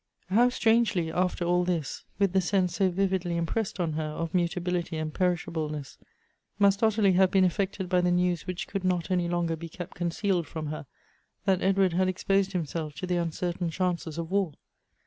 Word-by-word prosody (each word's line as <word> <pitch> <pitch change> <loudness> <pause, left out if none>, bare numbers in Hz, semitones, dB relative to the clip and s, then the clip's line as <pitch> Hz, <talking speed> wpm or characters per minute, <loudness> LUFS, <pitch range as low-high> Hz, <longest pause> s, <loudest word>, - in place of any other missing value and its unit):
HOW 240 +5 +5
strangely, 225 -8 +2
after 180 0 0
all 180 +1 +3
this, 170 -5 -2
with 200 -2 +2
the 190 - +4
sense 185 -1 +1
so 195 -2 +3
vividly 185 -2 0
impressed 190 +5 -2
on 165 -3 0
her 155 +1 -2
of 165 +1 -4
mutability 175 -1 -1
and 155 -1 -3
perishableness, 160 -5 -2 0.6
must 200 0 +4
Ottilie 215 -3 +4
have 185 +1 +5
been 190 0 +4
affected 190 0 -1
by 180 0 +2
the 180 - +2
news 175 -1 +1
which 180 -1 -4
could 195 -2 -3
not 180 -1 0
any 180 -2 +1
longer 170 -1 0
be 165 +1 -8
kept 175 +1 -8
concealed 175 0 -1
from 160 -2 -5
her, 155 - -7 0.6
that 190 -2 +2
Edward 195 -2 +3
had 185 +2 +2
exposed 195 +1 +1
himself 160 -3 -3
to 185 - -4
the 180 -1 0
uncertain 170 +1 -2
chances 170 -2 -2
of 165 +1 -4
war 195 -6 +1
180 Hz, 185 wpm, -28 LUFS, 170-190 Hz, 0.6 s, HOW